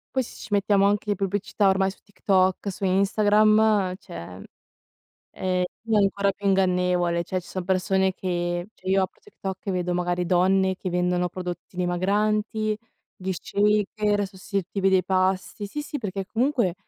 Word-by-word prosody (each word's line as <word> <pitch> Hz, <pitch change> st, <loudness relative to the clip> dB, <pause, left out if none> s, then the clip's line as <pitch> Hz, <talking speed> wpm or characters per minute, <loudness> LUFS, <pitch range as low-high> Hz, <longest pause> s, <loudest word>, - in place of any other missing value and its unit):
Poi 260 Hz, -, +2 dB
se -, -, -11 dB
ci -, -, -10 dB
mettiamo 200 Hz, -1 st, +3 dB
anche 205 Hz, +1 st, +1 dB
le 205 Hz, -, +2 dB
pubblicità, 200 Hz, +1 st, 0 dB
ormai 190 Hz, 0 st, +2 dB
su -, -, -18 dB
TikTok, 195 Hz, -1 st, +1 dB
su 190 Hz, -, -9 dB
Instagram, 210 Hz, +1 st, +3 dB
cioè. 90 Hz, -, -9 dB, 0.9 s
Eh, 185 Hz, -1 st, -1 dB, 0.2 s
lì 225 Hz, -1 st, -2 dB
è -, -, +5 dB
ancora 200 Hz, 0 st, +2 dB
più 200 Hz, +1 st, -4 dB
ingannevole, 180 Hz, -2 st, +2 dB
cioè, 185 Hz, +2 st, -2 dB
ci 180 Hz, -, -15 dB
sono 185 Hz, -, -4 dB
persone 190 Hz, +1 st, +1 dB
che 175 Hz, -1 st, -2 dB
cioè, 185 Hz, -, -7 dB
io 190 Hz, 0 st, +3 dB
apro 185 Hz, -, -7 dB
TikTok 195 Hz, -, -7 dB
e -, -, +1 dB
vedo, 180 Hz, -1 st, -1 dB
magari, 175 Hz, 0 st, 0 dB
donne 190 Hz, +2 st, +3 dB
che 185 Hz, -, -5 dB
vendono 180 Hz, 0 st, 0 dB
prodotti 180 Hz, 0 st, -7 dB
dimagranti, 210 Hz, +4 st, 0 dB, 0.4 s
gli 190 Hz, 0 st, -4 dB
shaker 205 Hz, +2 st, +1 dB
sostitutivi 195 Hz, 0 st, -2 dB
dei 190 Hz, -1 st, +3 dB
pasti. 185 Hz, +2 st, 0 dB
Sì, 295 Hz, +8 st, -4 dB
sì, 295 Hz, 0 st, -5 dB
perché 195 Hz, -3 st, -4 dB
comunque 235 Hz, -3 st, +1 dB
190 Hz, 160 wpm, -25 LUFS, 180-205 Hz, 0.9 s, è